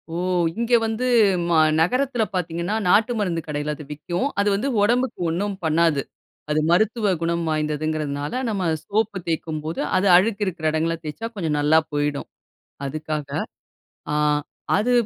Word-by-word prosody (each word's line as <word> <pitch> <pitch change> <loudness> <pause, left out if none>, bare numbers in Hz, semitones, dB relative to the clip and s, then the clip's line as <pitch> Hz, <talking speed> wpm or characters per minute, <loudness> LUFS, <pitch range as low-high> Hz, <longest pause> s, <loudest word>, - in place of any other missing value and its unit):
ஓ! - - -2 0.4
இங்கே 235 +1 +2
வந்து 225 +2 -1 0.4
ம 170 - +1 0.3
நகரத்தில 250 +7 +1
பார்த்தீங்கன்னா, 175 +2 -2
நாட்டு 220 +6 +4
மருந்து 175 -5 -1
கடையில 150 0 -2
அது 150 - -10
விக்கும். 175 - -2
அது 200 - +2
வந்து 205 +7 0
உடம்புக்கு 245 +5 +1
ஒண்ணும் 195 +5 -2
பண்ணாது. 160 -2 +2 0.5
அது 150 - +2
மருத்துவ 215 +3 +2
குணம் 170 0 0
வாய்ந்ததுங்கிறதுனால, 150 -1 -2 0.2
நம்ம 195 -5 -1 0.2
சோப்பு 215 0 -1
தேய்க்கும்போது 160 -1 -3 0.2
அது 190 +2 +2
அழுக்கு 205 +2 +1
இருக்கிற 170 -4 -4
இடங்கள்ல 165 +1 0
தேய்ச்சா 155 +10 -4
கொஞ்சம் 160 -7 -1
நல்லா 150 +2 +5
போயிடும். 145 -1 -1 0.6
அதுக்காக 155 +1 -4 0.9
அ - - +1 0.6
அது 235 +4 +1
170 Hz, 135 wpm, -23 LUFS, 155-205 Hz, 0.9 s, நல்லா